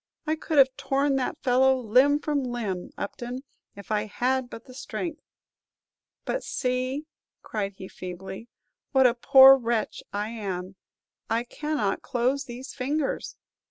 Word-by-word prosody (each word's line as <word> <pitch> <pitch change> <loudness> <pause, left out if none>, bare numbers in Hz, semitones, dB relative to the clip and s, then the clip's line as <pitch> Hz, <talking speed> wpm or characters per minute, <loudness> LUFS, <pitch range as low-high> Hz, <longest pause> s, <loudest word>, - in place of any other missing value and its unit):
I 310 0 +1
could 315 0 -3
have 265 -1 +6
torn 275 +1 +1
that 265 +3 -2
fellow 265 +1 +4
limb 255 +5 +4
from 290 -2 0
limb, 225 -8 -3
Upton, 245 +5 -5 0.3
if 200 +1 -10
I 210 0 +1
had 250 +4 -1
but 225 - -10
the 255 - -13
strength! 300 +4 -5 1.0
But - - -2
see," 255 +3 -2 0.4
cried 200 -2 -3
he, 190 - -8
feebly, 190 +5 -8 0.5
"what 265 -1 +5
a 245 - +6
poor 265 +2 +8
wretch 235 -3 -1
I 205 +1 -2
am; 190 -4 -5 0.5
I 230 +1 +1
cannot 245 -6 -2
close 255 +4 0
these 250 +2 -8
fingers!" 280 +2 -2
250 Hz, 140 wpm, -26 LUFS, 215-270 Hz, 1.0 s, poor